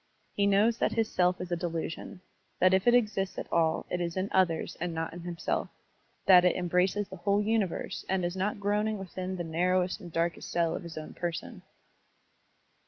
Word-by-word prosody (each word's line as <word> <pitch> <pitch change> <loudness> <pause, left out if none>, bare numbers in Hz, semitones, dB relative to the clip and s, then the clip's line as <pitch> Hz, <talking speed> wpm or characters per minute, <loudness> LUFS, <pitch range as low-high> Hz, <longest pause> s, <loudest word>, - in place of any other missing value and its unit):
He 200 0 +2
knows 210 +4 +3
that - - +1
his 225 -1 0
self 180 0 +2
is 180 -1 -6
a - - +2
delusion, 170 0 -4 0.4
that 185 +1 +4
if 190 +4 +2
it 240 - +7
exists 210 -5 +1
at - - -3
all 160 -1 +2
it 180 - -1
is 170 +1 -3
in 190 +2 -1
others 175 -4 +1
and 175 -1 -2
not 160 0 -3
in 175 - -7
himself, 175 0 -2 0.6
that 180 -2 +8
it 180 - +3
embraces 180 +3 +1
the 190 - -9
whole 200 +4 +1
tmiverse 215 -4 -1
and 190 -2 +1
is 175 +1 -2
not 200 +2 -1
groaning. 210 +2 0
within 185 -1 -5
the 175 - -3
narrowest 180 +3 +1
and 175 - -9
darkest 165 +1 -1
cell 170 -1 +1
of - - -4
his 170 -3 -9
own 155 - -7
person. 170 -2 -5
180 Hz, 195 wpm, -29 LUFS, 170-200 Hz, 0.6 s, that